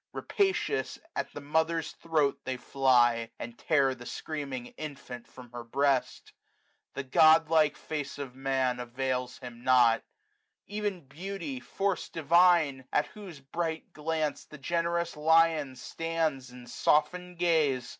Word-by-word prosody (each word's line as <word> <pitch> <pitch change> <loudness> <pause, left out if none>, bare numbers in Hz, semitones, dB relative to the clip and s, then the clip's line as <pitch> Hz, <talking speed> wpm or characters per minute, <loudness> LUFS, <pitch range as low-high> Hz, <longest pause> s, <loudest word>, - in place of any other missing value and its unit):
Rapacious, 400 +2 0 0.2
at - - -3
the 145 - -8
mother's 160 +2 0
throat 155 -4 0
they 130 -1 -3
fly. 120 -3 +3
And 120 0 -7
tear 140 -2 +2
the 125 -1 -11
screaming 140 -5 -5
infant 140 -5 -8
from 125 -2 -14
her 120 -1 -7
breast. 135 +2 0 0.6
The 140 - -3
godlike 155 +2 +5
face 145 -3 -5
of 140 -3 -6
Man 130 -2 0
avails 125 +1 -3
him 120 -2 -10
nought. 125 -3 +5 0.7
Ev'n 205 -2 -3
beauty, 160 0 -6
force 195 +9 -2
divine! 165 -3 +3
at 150 - +2
whose 185 -9 -10
bright 160 +3 -4
glance 155 -1 -2
405 - - -37
The 150 - -10
generous 170 +1 -1
lion 160 -3 +3
stands 160 -1 -2
in 125 0 -12
softened 180 +7 +1
gaze. 155 -8 +2
145 Hz, 130 wpm, -29 LUFS, 130-165 Hz, 0.7 s, godlike